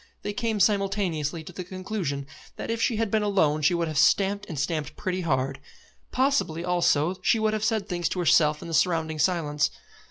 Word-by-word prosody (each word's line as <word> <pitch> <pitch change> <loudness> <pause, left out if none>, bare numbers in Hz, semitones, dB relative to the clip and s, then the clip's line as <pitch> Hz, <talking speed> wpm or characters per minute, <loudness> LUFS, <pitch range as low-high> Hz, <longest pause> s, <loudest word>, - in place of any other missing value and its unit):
They 205 - -3
came 225 -1 -1
simultaneously 195 -7 0
to 180 - -11
the 180 - -5
conclusion 185 -6 -4 0.3
that - - -4
if 230 0 -2
she 230 - +2
had 220 -2 -1
been 220 - +2
alone 175 -8 +2
she 150 +4 +3
would 170 -1 0
have 155 -2 -1
stamped, 200 +1 +3
and 160 - -5
stamped 150 +1 -2
pretty 185 -1 -2
hard. 135 -4 -1 0.5
Possibly 250 - +1
also 175 -1 +2
she 230 - +3
would 220 -1 +1
have 215 -1 -2
said 220 -3 0
things 175 -3 -1
to 185 - -3
herself 155 -3 +3
and - - -7
the - - -5
surrounding 160 -2 +1
silence. 150 -4 +1
180 Hz, 195 wpm, -26 LUFS, 155-205 Hz, 0.5 s, she